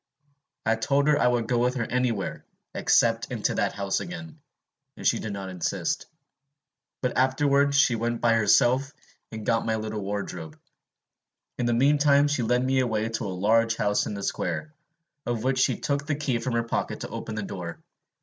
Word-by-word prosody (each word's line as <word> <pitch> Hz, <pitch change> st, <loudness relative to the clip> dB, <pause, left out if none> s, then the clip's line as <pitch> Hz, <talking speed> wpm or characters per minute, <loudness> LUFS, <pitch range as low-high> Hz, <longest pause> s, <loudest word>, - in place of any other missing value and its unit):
I 110 Hz, +1 st, +2 dB
told 140 Hz, +5 st, +1 dB
her 150 Hz, -1 st, +4 dB
I -, -, +4 dB
would 120 Hz, -2 st, +1 dB
go 120 Hz, 0 st, +1 dB
with 125 Hz, +1 st, +1 dB
her 125 Hz, -, -1 dB
anywhere, 120 Hz, -4 st, -1 dB, 0.3 s
except -, -, +2 dB
into -, -, -1 dB
that -, -, 0 dB
house 100 Hz, -1 st, -1 dB
again; 170 Hz, -3 st, -8 dB, 0.6 s
and -, -, -9 dB
she -, -, +3 dB
did 110 Hz, -, -4 dB
not 100 Hz, -1 st, -5 dB
insist, 90 Hz, -2 st, -2 dB, 1.0 s
but 125 Hz, -, 0 dB
afterwards 140 Hz, +2 st, +3 dB
went 115 Hz, 0 st, -1 dB
by 115 Hz, -1 st, +3 dB
herself 120 Hz, +5 st, +3 dB, 0.4 s
and 110 Hz, -2 st, -7 dB
got 115 Hz, -1 st, +1 dB
my 110 Hz, -, +1 dB
little 110 Hz, -1 st, -4 dB
wardrobe. 95 Hz, -5 st, -5 dB, 1.0 s
In 120 Hz, -, +1 dB
the 120 Hz, -, +2 dB
mean 140 Hz, +4 st, +4 dB
time 145 Hz, 0 st, +5 dB
she 145 Hz, -3 st, 0 dB
led 125 Hz, +2 st, +1 dB
me 130 Hz, 0 st, +2 dB
away 110 Hz, -3 st, 0 dB
to 115 Hz, -, -3 dB
a -, -, -2 dB
large 110 Hz, +5 st, +2 dB
house 105 Hz, -2 st, +1 dB
in 105 Hz, -, -4 dB
a 100 Hz, -, -6 dB
square, 155 Hz, +9 st, -3 dB, 0.5 s
of 120 Hz, -2 st, -1 dB
which 130 Hz, 0 st, +1 dB
she -, -, +2 dB
took 140 Hz, 0 st, -2 dB
the 145 Hz, -, 0 dB
key 140 Hz, -5 st, -1 dB
from 120 Hz, +1 st, -3 dB
her 115 Hz, 0 st, +1 dB
pocket 115 Hz, -, -3 dB
to -, -, -5 dB
open 110 Hz, -, -6 dB
the 105 Hz, -, -3 dB
door. 90 Hz, -4 st, -6 dB
120 Hz, 190 wpm, -26 LUFS, 110-135 Hz, 1.0 s, time